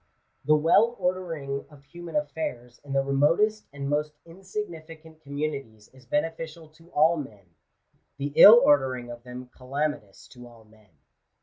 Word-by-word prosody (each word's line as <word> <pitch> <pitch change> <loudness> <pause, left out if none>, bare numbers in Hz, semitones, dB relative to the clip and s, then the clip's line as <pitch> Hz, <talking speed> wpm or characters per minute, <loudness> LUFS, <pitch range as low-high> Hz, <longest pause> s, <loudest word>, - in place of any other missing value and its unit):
The 155 - +5
well 200 +10 +3
ordering 165 -7 -3
of 145 -2 -18
human 170 +2 -10
affairs 145 -5 -4
in 140 -1 -7
the 135 0 +2
remotest 165 +11 +1
and 140 -1 -6
most 150 +1 -1
insignificant 165 -3 -9
com 140 -1 -11
munities 140 -9 -5
is 130 -2 -20
beneficial 160 +2 -3
to 165 +2 -22
all 160 +3 +3
men: 105 - -10 0.6
the 140 +1 -4
ill 225 +3 +10
ordering 130 -4 +2
of 120 0 -10
them 125 0 -10
> - - -42
calamitous 135 -5 -4
to 125 -2 -13
all 115 -2 -17
men. 110 -1 -24
145 Hz, 150 wpm, -26 LUFS, 130-165 Hz, 0.6 s, ill